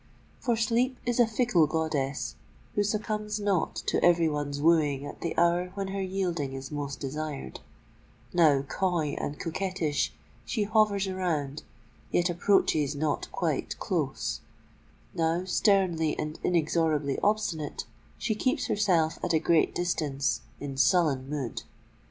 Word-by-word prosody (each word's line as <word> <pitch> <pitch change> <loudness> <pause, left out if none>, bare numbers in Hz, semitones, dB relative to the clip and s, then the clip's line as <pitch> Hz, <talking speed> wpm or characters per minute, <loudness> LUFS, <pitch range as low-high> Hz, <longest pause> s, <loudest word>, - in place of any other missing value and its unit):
For 240 -3 +1
sleep 235 +3 +1
is 240 0 0
a 240 - +6
fickle 220 -8 +3
goddess, 145 -4 -1 0.4
who 205 - +2
succumbs 210 0 -2
not 200 -4 0
to - - +1
every 170 -1 +5
one's 145 -2 -2
wooing 150 -3 +3
at - - -9
the 170 - -3
hour 175 +1 +3
when 195 -1 -3
her 195 0 -3
yielding 180 -7 -2
is 135 +1 -7
most 145 -2 -4
desired: 145 - -5 0.7
now 150 -6 +5
coy 170 +1 0
and 145 - -3
coquettish, 170 -3 -1 0.3
she 220 - -1
hovers 205 -2 +2
around, 155 -7 -2 0.5
yet 175 0 +2
approaches 160 -5 +2
not 150 +1 -1
quite - - -2
close:—now 165 +2 -3
sternly 185 -5 +2
and 155 +1 -4
inexorably 155 -4 +1
obstinate, 205 -8 -1 0.3
she 220 - -1
keeps 255 +7 0
herself 175 -6 +2
at - - 0
a 160 - +4
great 165 0 +2
distance, 150 -6 0 0.2
in 140 -2 -5
sullen 140 -4 +3
mood. 140 -5 -3
170 Hz, 130 wpm, -28 LUFS, 150-195 Hz, 0.7 s, a